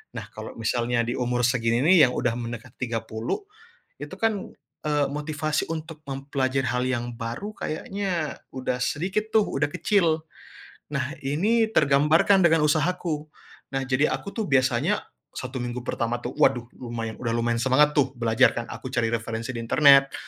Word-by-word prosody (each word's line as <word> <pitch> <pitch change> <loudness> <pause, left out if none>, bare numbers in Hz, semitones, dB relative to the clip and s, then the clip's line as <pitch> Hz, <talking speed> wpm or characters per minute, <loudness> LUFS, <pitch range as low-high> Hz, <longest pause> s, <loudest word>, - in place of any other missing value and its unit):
Nah, - - -6
kalau - - -7
misalnya 120 +2 0
di 120 - -1
umur 125 -1 0
segini, 115 -1 +1
nih, 160 -4 +7
yang - - -3
udah 120 -1 0
mendekati 120 -1 -6
30, 115 - -3 0.6
itu, - - -7
kan, 220 -3 -1 0.4
eee, 145 -2 +2
motivasi 150 +2 -2
untuk 160 -1 -6
mempelajari 135 -1 -1
hal 125 +1 0
yang 120 -2 -1
baru 120 - -5
kayaknya 175 -2 -3
udah 130 -1 -2
sedikit, 190 +10 -1
tuh, 220 -1 +5
udah 145 -4 -1
kecil. 165 -6 +2 0.7
Nah, 140 +1 -1
ini 210 +12 +2
tergambarkan 155 +5 +4
dengan 165 -1 +4
usahaku. 155 0 0 0.5
Nah, 135 - 0
jadi 135 +3 +2
aku, 200 - -5
tuh, 220 -3 -2
biasanya 130 +8 +2 0.3
satu 130 +1 -5
minggu 120 0 -4
pertama, 120 +1 -2
tuh, 120 - -4
waduh, 125 -3 +3
lumayan 115 -3 -5
udah 115 -2 -2
lumayan 115 0 +1
semangat, 145 +3 +4
tuh, 135 -2 +3
belajar, 115 -1 +3
kan, 115 0 -4
aku 115 +3 -7
cari 115 -2 +1
referensi 115 +1 -3
di - - -5
internet, 135 +2 +5
135 Hz, 155 wpm, -25 LUFS, 120-155 Hz, 0.7 s, nih